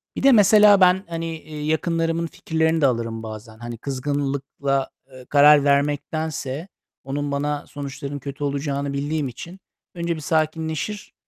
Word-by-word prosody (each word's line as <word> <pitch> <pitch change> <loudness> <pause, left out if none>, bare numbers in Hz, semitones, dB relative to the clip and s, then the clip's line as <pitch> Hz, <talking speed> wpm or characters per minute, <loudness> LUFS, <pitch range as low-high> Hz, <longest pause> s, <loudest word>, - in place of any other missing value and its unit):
Bir - - -4
de 275 - +7
mesela 210 -2 +7
ben, 185 +2 +5
hani, 165 -1 -4
iii, 150 -1 -7
yakınlarımın 165 +1 0
fikirlerini 160 0 0
de - - +5
alırım 115 -2 -2
bazen. 110 0 -9
Hani, 120 -1 -7
kızgınlıkla, 140 0 -2 0.2
ııı, 130 -1 -13
karar 145 0 +6
vermektense 145 +1 -1 0.4
onun 140 +2 -3
bana 145 +1 -2
sonuçlarının 140 0 -6
kötü 140 +1 -7
olacağını 140 0 -2
bildiğim 145 +1 -1
için 170 +10 -9 0.4
önce 170 -1 -2
bir 155 - -7
sakinleşir, 160 +6 -2
145 Hz, 140 wpm, -22 LUFS, 140-165 Hz, 0.4 s, de